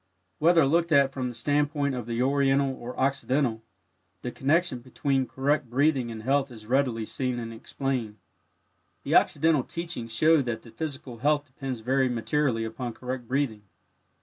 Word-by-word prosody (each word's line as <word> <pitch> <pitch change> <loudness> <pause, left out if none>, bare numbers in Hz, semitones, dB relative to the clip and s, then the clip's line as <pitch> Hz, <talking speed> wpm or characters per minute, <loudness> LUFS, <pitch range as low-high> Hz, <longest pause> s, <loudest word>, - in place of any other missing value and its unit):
Whether 165 -1 +5
looked 170 +4 +2
at 140 -2 +5
from 130 -2 -2
the 120 - -8
standpoint 145 +2 +1
of 120 -3 -5
the 120 +1 0
Oriental 135 0 +2
or 125 0 -8
Occidental, 135 -3 +1 0.6
the 125 - -3
connection 145 +1 +1
between 130 +1 -1
correct 140 0 0
breathing 135 -1 +2
and 110 -1 -7
health 140 +2 +1
is 110 -3 -12
readily 125 -2 +1
seen 125 +2 -2
and 115 -1 -5
explained. 115 -2 -3 0.9
The - - -2
Occidental 160 -3 +4
teachings 165 -9 -5
show 155 +7 +4
that 120 -3 -3
the 115 - -13
physical 135 -2 -6
health 145 +2 +2
depends 130 -3 -6
very 130 +2 +2
materially 125 0 0
upon 120 +2 -5
correct 125 -1 -5
breathing. 130 -5 -1
130 Hz, 155 wpm, -27 LUFS, 120-145 Hz, 0.9 s, Whether